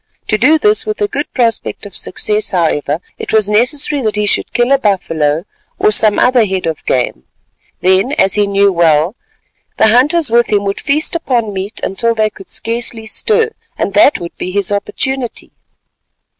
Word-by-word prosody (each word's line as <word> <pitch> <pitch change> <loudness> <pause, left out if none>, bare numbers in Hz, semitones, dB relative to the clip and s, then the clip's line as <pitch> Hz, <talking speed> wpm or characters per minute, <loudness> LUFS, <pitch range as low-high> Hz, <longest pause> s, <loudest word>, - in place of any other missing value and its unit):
To 215 - +2
do 295 +8 +5
this 420 +5 +3
with 430 -1 -4
a 415 - +1
good 290 -6 -4
prospect 230 -5 -1
of 205 - -11
success, 210 0 -2
however, 160 -4 -1 0.2
it - - -5
was 215 -2 +2
necessary 270 +7 +1
that 215 -3 -1
he 210 0 0
should 205 - 0
kill 240 +2 +1
a 275 - +4
buffalo, 165 - 0 0.3
or 210 - +2
some 215 0 +3
other 250 -2 +4
head 190 -3 -2
of 160 -2 -3
game. 120 - -1 0.6
Then, 190 +9 +2
as 195 -9 +2
he 205 -1 +2
knew 200 0 +2
well, 165 +2 +2 0.6
the 220 - +4
hunters 270 +4 +3
with 235 -1 +2
him 205 -1 +2
would 200 0 -3
feast 300 +4 +1
upon 240 -10 -1
meat 195 +3 -5
until 230 +4 -1
they 215 -1 +1
could 195 - -14
scarcely 230 -1 -2
stir, 445 - +1 0.3
and - - -2
that 290 - +5
would 170 -1 -8
be - - -4
his 200 +1 +1
opportunity. 245 +5 -3
215 Hz, 180 wpm, -14 LUFS, 195-255 Hz, 0.6 s, do